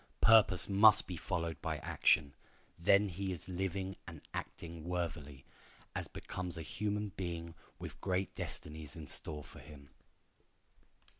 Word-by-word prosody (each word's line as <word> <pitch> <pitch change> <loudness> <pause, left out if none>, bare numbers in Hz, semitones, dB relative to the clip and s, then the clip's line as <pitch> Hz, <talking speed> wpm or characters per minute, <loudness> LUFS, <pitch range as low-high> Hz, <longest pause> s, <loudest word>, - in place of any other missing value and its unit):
Purpose 110 -4 +6
must 105 +2 +7
be 90 - -5
followed 85 -2 -2
by - - -1
action. 70 -2 +2 0.5
Then 100 +4 +5
is 90 - -7
he 95 -2 -2
living 95 +1 -2
and 80 -3 -8
acting 85 -1 -6
worthily, 80 -6 -4 0.5
as - - -3
becomes 90 -2 -5
a 80 - -4
human 105 +6 -2
being 85 -3 -5 0.2
with - - -8
great 95 0 0
destinies 75 0 -6
in 80 -2 -7
store 75 +1 -4
for - - -13
him. 70 -2 -13
85 Hz, 135 wpm, -35 LUFS, 80-95 Hz, 0.5 s, must